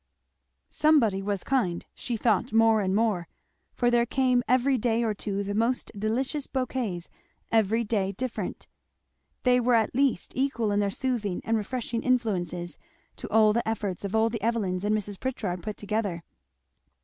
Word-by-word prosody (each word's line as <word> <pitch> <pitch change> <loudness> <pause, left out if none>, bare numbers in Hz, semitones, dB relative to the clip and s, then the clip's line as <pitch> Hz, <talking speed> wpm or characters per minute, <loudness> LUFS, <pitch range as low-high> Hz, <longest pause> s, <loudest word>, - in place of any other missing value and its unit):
Somebody 245 -11 +3
was 200 -1 -2
kind, 210 -11 0
she 235 - -3
thought 215 -3 +1
more 225 -1 +4
and 190 -1 0
more; 210 -6 +1 0.5
for 245 -1 +2
there 240 0 +3
came 255 -1 +2
every 255 +2 +3
day 235 -1 +1
or 220 -2 +1
two 200 -1 -3
the 200 +1 -3
most 230 +4 0
delicious 255 +8 -1
bouquets, 245 -9 -2 0.4
every 225 +1 +3
day 205 -3 0
different. 250 +5 -4 0.8
They 250 -1 +4
were 245 0 +3
at 225 -2 +2
least 265 -7 +1
equal 245 -5 0
in 205 - +2
their 200 -1 +1
soothing 215 -4 -2
and 225 - 0
refreshing 230 +1 -2
influences 180 - -1 0.4
to - - -7
all 215 -1 +5
the 235 +1 -1
efforts 205 -5 -3
of 200 +2 -3
all 225 +1 +3
the 230 - -4
Evelyns 205 -5 -1
and 210 +1 +2
Mrs. 205 -2 -5
Pritchard 210 -9 -3
put 210 +4 -5
together. 205 -5 -2
225 Hz, 160 wpm, -27 LUFS, 200-245 Hz, 0.8 s, all